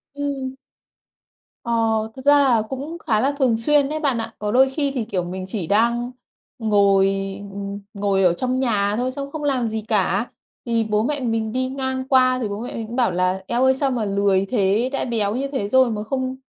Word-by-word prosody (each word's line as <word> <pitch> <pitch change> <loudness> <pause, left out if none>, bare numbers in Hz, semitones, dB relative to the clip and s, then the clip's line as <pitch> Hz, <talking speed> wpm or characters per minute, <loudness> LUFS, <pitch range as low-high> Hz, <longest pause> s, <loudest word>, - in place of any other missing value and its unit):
Ừm. 275 -2 -3 1.1
Ờ, 235 - -2 0.4
thực 260 - -10
ra 290 0 +6
là 255 -5 +4
cũng 280 +5 -5
khá 215 -7 0
là 270 +6 +2
thường 250 -5 +3
xuyên 280 +4 +2
đấy 310 +1 -2
bạn 280 -6 0
ạ. 225 -1 -4
Có 210 0 -2
đôi 260 +3 +5
khi 280 +1 -1
thì, 240 -4 -1
kiểu, 195 -5 -2
mình 185 +2 -5
chỉ 190 -4 -4
đang 235 +4 +1 0.5
ngồi, 200 -3 +4 0.5
ừm, 200 0 -5
ngồi 200 -1 +1
ở 180 -2 +4
trong 255 +7 -1
nhà 205 -5 +1
thôi 250 +2 -1
xong 280 +1 -6
không 310 -2 -5
làm 260 -5 +1
gì 220 0 -3
cả, 205 +1 0 0.3
thì 230 -1 +1
bố 215 0 0
mẹ 290 +3 -1
mình 225 -3 -1
đi 255 +2 -1
ngang 260 -1 -3
qua 255 -1 +4
thì 225 - -1
bố 205 +1 -5
mẹ 245 - -6
mình 225 -1 -5
cũng 235 - -7
bảo 250 -2 +2
là 185 +1 0
"Eo 240 +2 +1
ơi, 260 0 +5
sao 270 0 0
mà 235 -4 -1
lười 200 -1 +2
thế, 220 +1 +1
đã - - -1
béo 220 -3 -1
như 270 +2 -1
thế 265 -8 -3
rồi 260 +2 +4
mà 210 -1 -3
không 260 +3 -2
235 Hz, 220 wpm, -22 LUFS, 205-260 Hz, 1.1 s, ra